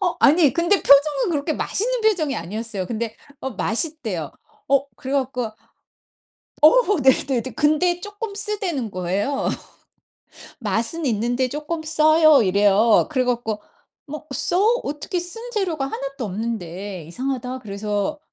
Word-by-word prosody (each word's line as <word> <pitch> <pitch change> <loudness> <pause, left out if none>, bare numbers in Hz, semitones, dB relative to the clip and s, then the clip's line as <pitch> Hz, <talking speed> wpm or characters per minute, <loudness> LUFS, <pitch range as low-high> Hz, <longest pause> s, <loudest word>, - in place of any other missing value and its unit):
어 360 -3 0
아니 300 -1 +5
근데 345 +4 +3
표정은 285 +1 +4
그렇게 300 0 -1
맛있는 - - -1
표정이 365 -11 +1
아니었어요. 200 +2 -4
근데 230 -1 -4 0.3
어 265 - -4
맛있대요. 225 - -3 0.4
어 275 0 +3
그래 265 +1 -6
갖고 260 -3 -1 1.2
어 400 - +5
네네 265 -1 +3
근데 315 +4 +2
쪼끔 415 +1 -6
쓰다는 390 - -3
거예요. 195 +9 -1 1.1
"맛은 230 - -1
있는데 245 +2 0
쪼끔 305 +4 -4
써요." 310 -1 +5
이래요. 205 +3 +4
그래 260 -4 +1
갖고 235 -4 -2 0.5
"뭐 305 +1 -7
써? 360 +9 +2 0.2
어떻게 300 +6 -3
쓴 350 +6 -6
재료가 355 - -1
하나도 275 -1 -5
없는데 195 -4 -5
이상하다." 255 - -4
그래서 205 +5 -3
275 Hz, 280 characters per minute, -22 LUFS, 225-320 Hz, 1.2 s, 아니